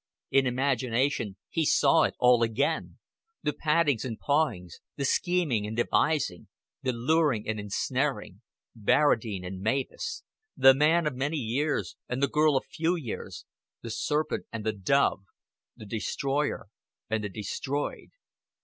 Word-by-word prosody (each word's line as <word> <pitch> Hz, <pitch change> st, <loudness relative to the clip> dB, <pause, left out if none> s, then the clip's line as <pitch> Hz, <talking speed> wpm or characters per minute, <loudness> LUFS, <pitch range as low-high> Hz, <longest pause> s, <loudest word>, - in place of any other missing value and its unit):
In 135 Hz, -1 st, +4 dB
imagination 125 Hz, -4 st, 0 dB
he 165 Hz, -, -1 dB
saw 150 Hz, +2 st, +4 dB
it -, -, -3 dB
all 125 Hz, -1 st, +5 dB
again 115 Hz, +4 st, 0 dB, 0.5 s
the 150 Hz, -, 0 dB
pattings 150 Hz, -6 st, +1 dB
and 115 Hz, -4 st, -5 dB
pawings, 140 Hz, -, 0 dB, 0.2 s
the 140 Hz, -, -2 dB
scheming 150 Hz, -, +1 dB
and 110 Hz, +2 st, -6 dB
devising, 130 Hz, -, +1 dB, 0.3 s
the 130 Hz, -2 st, 0 dB
luring 130 Hz, -1 st, +1 dB
and 110 Hz, -1 st, -2 dB
ensnaring 105 Hz, 0 st, -2 dB, 0.3 s
Barradine 110 Hz, -4 st, +2 dB
and 95 Hz, +1 st, -6 dB
Mavis 135 Hz, -, -2 dB, 0.3 s
the 135 Hz, 0 st, +8 dB
man 155 Hz, +5 st, +3 dB
of 150 Hz, -, 0 dB
many 140 Hz, +5 st, -2 dB
years 125 Hz, -, -1 dB
and 125 Hz, -, -2 dB
the -, -, +5 dB
girl 150 Hz, 0 st, +3 dB
of -, -, -3 dB
few 165 Hz, +3 st, -1 dB
years, 135 Hz, -11 st, -6 dB, 0.4 s
the 115 Hz, -, -5 dB
serpent 150 Hz, +7 st, -1 dB
and 115 Hz, -2 st, -5 dB
the 110 Hz, -, +1 dB
dove, 105 Hz, +2 st, +2 dB, 0.6 s
the 110 Hz, -, -10 dB
destroyer 135 Hz, +3 st, -2 dB, 0.4 s
and 110 Hz, -1 st, -1 dB
the 105 Hz, -, -3 dB
destroyed. 120 Hz, +8 st, -4 dB
130 Hz, 140 wpm, -28 LUFS, 110-150 Hz, 0.6 s, the